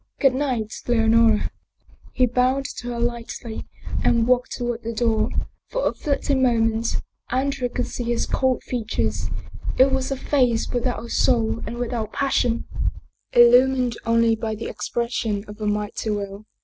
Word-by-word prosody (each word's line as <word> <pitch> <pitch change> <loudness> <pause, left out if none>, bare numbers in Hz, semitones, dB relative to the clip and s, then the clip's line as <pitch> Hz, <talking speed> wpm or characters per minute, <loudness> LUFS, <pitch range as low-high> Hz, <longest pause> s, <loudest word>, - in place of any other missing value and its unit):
Good 270 -2 +4
night, 255 -6 -1
Leonora! 225 -2 +4 0.3
" - - -26
He 255 - +4
bowed 255 +3 +1
to 245 - -6
her 240 -1 -3
lightly 235 -1 -4 0.4
and 230 -1 +3
walked 250 0 +2
toward 240 -1 -2
the 230 0 -5
door. 220 -1 +2 0.4
For - - 0
a - - 0
fleeting 280 -2 0
moment 225 -2 +2 0.3
Andrea 260 0 0
could 250 +1 -2
see 245 - -5
his 235 0 0
cold 260 -1 0
features. 230 -3 -2 0.5
It 265 +1 +6
was 265 -1 0
a 275 - -2
face 250 -5 +1
without 245 -1 -1
a - - -10
soul 230 -2 +2
and 235 +2 -5
without 235 -3 -3
passion, 250 -4 +1 0.7
illumined 245 0 +5
only 230 0 +3
by 220 0 -3
the 220 - -6
expression 230 -3 -2
of 210 +1 -10
a 210 - -1
mighty 210 +1 -2
will. 205 0 -4
235 Hz, 155 wpm, -23 LUFS, 225-255 Hz, 0.7 s, It